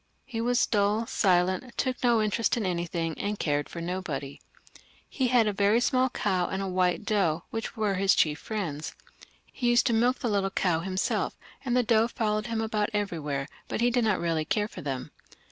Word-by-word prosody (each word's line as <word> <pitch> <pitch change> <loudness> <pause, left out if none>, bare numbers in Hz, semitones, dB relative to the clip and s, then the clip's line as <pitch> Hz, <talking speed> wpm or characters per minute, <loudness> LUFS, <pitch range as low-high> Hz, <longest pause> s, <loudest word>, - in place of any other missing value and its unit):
He 230 -4 -4
was 245 +1 +2
duU, 210 +2 +1
silent, 185 +4 +1
took 255 -1 -1
no 235 -3 +4
interest 225 +3 +1
in 220 - -1
anything, 170 -2 -2
and 205 +1 -2
cared 145 -4 -1
for 170 - -6
nobody. 165 -6 -4 0.7
He 260 -3 -1
had 245 -2 +4
a 210 - 0
very 205 +3 +3
small 255 +1 +2
cow 185 -6 0
and 190 - -3
a 195 - -2
white 185 +2 +1
doe, 175 -7 +1
which 225 +1 -4
were 210 -2 +1
his 195 0 +3
chief 150 -2 +2
friends. 170 -9 -4 0.5
He 245 -2 -2
used 240 +1 +4
to 240 - +2
milk 245 +3 +3
the - - -3
little 200 -3 +1
cow 180 -4 +1
himself, 190 +2 -1 0.3
and 250 -2 +1
the 250 - +4
doe 225 0 +3
followed 215 -2 -1
him 225 -1 -1
about 215 -2 0
everywhere; 150 -9 -2 0.2
but - - -3
he 240 +1 +3
did 245 0 +2
not 215 -4 +2
really 165 -2 0
care 210 +6 0
for - - -9
them. 135 -3 -4
205 Hz, 195 wpm, -28 LUFS, 175-230 Hz, 0.7 s, no